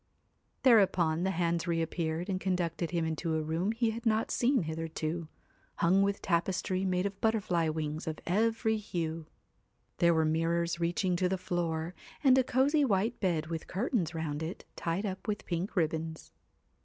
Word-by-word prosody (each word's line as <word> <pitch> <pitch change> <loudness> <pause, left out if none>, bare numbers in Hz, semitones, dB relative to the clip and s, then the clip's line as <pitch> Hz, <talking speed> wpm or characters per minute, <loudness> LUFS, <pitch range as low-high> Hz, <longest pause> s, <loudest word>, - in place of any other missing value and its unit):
Thereupon 185 -8 +4
the - - +2
hands 170 -2 0
reappeared 165 0 -1
and 190 -2 -2
conducted 175 -3 -1
him 170 -2 0
into 160 0 -1
a 155 - 0
room 165 +6 0
he 225 0 +1
had 230 +1 -6
not 220 -1 +1
seen 250 -3 +2
hitherto, 160 +1 -3 0.5
hung 185 +4 +3
with 200 0 0
tapestry 185 +2 0
made 180 0 +1
of 200 -1 -4
butterfly 185 -7 +1
wings 155 0 -3
of 155 -1 -2
every 220 +4 +1
hue; 165 -6 -4 0.7
there 170 -1 +4
were 160 0 +3
mirrors 170 +2 0
reaching 175 +2 +1
to 180 0 +1
the 190 - 0
floor, 170 -2 -2 0.3
and 265 -2 +7
a - - +4
cozy 280 +5 +3
white 220 -1 +1
bed 170 -6 0
with 165 0 -5
curtains 190 - -1
round 155 -2 -3
it 160 +4 -5
tied 170 +5 -2
up 190 +1 -5
with 210 0 -2
pink 175 +4 -3
ribbons. 160 -2 -2
175 Hz, 165 wpm, -31 LUFS, 160-200 Hz, 0.7 s, and